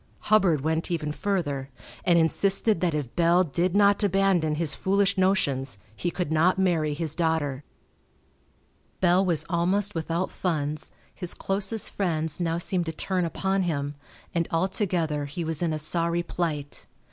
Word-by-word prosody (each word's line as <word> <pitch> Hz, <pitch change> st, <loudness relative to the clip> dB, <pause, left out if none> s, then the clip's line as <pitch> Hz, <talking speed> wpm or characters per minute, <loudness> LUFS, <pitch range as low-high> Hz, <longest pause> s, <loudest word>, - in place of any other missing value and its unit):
Hubbard 180 Hz, -9 st, +4 dB
went 160 Hz, +2 st, -1 dB
even 155 Hz, -3 st, -2 dB
further, 150 Hz, -7 st, -2 dB, 0.3 s
and 175 Hz, -1 st, +4 dB
insisted 195 Hz, +4 st, +2 dB
that 170 Hz, -4 st, +1 dB
if 140 Hz, -5 st, -4 dB
Bell 175 Hz, +1 st, +4 dB
did 175 Hz, +4 st, -1 dB
not 205 Hz, 0 st, +4 dB
abandon 195 Hz, -6 st, +2 dB
his 155 Hz, -2 st, +1 dB
foolish 195 Hz, +5 st, +1 dB
notions 140 Hz, -, +1 dB, 0.2 s
he 175 Hz, -, -2 dB
could 175 Hz, -2 st, -3 dB
not 165 Hz, +4 st, +3 dB
marry 165 Hz, -6 st, +1 dB
his 155 Hz, -1 st, -2 dB
daughter. 160 Hz, -5 st, -1 dB, 1.4 s
Bell 180 Hz, +1 st, +4 dB
was 175 Hz, -5 st, +1 dB
almost 185 Hz, +4 st, 0 dB
without 165 Hz, +2 st, -2 dB
funds, 155 Hz, -4 st, -2 dB, 0.2 s
his 180 Hz, -, 0 dB
closest 195 Hz, +3 st, 0 dB
friends 160 Hz, -5 st, -1 dB
now 165 Hz, -1 st, 0 dB
seemed 175 Hz, 0 st, 0 dB
to -, -, -1 dB
turn 180 Hz, +2 st, -1 dB
upon 190 Hz, +3 st, -1 dB
him, 145 Hz, -5 st, -2 dB, 0.4 s
and 170 Hz, -2 st, 0 dB
altogether 165 Hz, -4 st, 0 dB
he 145 Hz, +5 st, -5 dB
was 160 Hz, 0 st, -1 dB
in 170 Hz, -2 st, +1 dB
a 155 Hz, -, -1 dB
sorry 170 Hz, +2 st, 0 dB
plight. 155 Hz, -5 st, -3 dB
170 Hz, 150 wpm, -26 LUFS, 155-185 Hz, 1.4 s, Hubbard